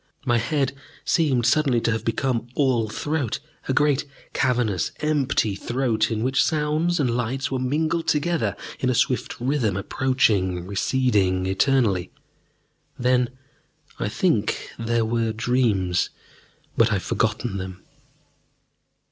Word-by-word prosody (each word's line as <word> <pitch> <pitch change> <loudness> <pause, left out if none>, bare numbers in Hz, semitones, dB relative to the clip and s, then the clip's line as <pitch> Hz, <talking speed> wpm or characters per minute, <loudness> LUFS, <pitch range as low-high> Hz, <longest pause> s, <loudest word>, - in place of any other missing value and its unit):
My 120 -2 +3
head 135 +2 0 0.3
seemed 135 -8 +2
suddenly 130 -1 +3
to 115 - +1
have 115 - -2
become 120 0 -1
all 125 -6 +2
throat, 145 0 -2 0.3
a - - +1
great, 145 0 +2 0.3
cavernous, 120 -8 +1
empty 140 -8 +1
throat 115 +1 0
in 110 -1 -2
which 130 +2 +3
sounds 155 +3 +1
and 125 -5 +1
lights 125 +4 -2
were 130 - -1
mingled 155 +6 0
together, 165 +3 +1 0.2
in 130 - +1
a 125 - +1
swift 125 +2 0
rhythm, 120 -6 0
approaching, 100 -5 +1
receding 100 -3 +1
eternally. 95 -2 +2 0.9
Then, 125 0 +2 0.7
I - - -1
think, - - 0
there 115 0 +1
were 115 0 0
dreams. 110 -7 +1 0.7
But 115 0 +4
I - - +1
have 95 - -1
forgotten 110 -2 -1
them.... 95 -1 -7
120 Hz, 125 wpm, -24 LUFS, 110-135 Hz, 0.9 s, But